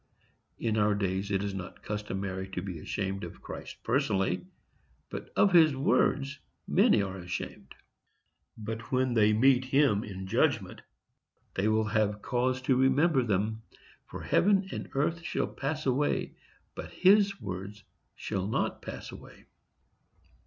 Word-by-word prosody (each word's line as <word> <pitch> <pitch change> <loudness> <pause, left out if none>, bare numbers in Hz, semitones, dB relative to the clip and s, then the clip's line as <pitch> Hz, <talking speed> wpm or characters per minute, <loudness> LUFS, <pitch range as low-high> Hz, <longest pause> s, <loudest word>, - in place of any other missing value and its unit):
In 110 -2 -1
our 105 -1 +3
days 100 0 -1
it 100 -1 0
is 100 -1 -3
not 95 -1 -8
customary 95 -2 -4
to 90 - -2
be 90 -4 -5
ashamed 95 +3 -3
of - - -8
Christ - - -9
personally, 115 - 0 0.6
but - - -6
of 200 -2 +4
his 160 -5 +6
words 135 0 +1 0.3
many 100 - +4
are 95 -1 -5
ashamed. 90 +1 -6 0.8
But 115 +1 -6
when 130 -1 +2
they 110 -2 +4
meet 130 +4 +4
Him 130 -6 +3
in 95 -2 -7
judgment 95 - 0 0.7
they 100 +2 0
will 110 0 +2
have 105 -1 0
cause 130 +1 0
to 130 0 +3
remember 135 +3 +3
them; 110 0 -1 0.5
for - - -8
heaven 195 0 +3
and - - -5
earth 155 +5 0
shall - - -1
pass 150 +3 -4
away, 135 +2 0 0.4
but - - -7
His 200 +1 +4
word 95 +2 -6 0.4
shall 95 -2 -3
not 110 - -1
pass - - -7
away. - - -13
110 Hz, 140 wpm, -29 LUFS, 100-135 Hz, 0.8 s, his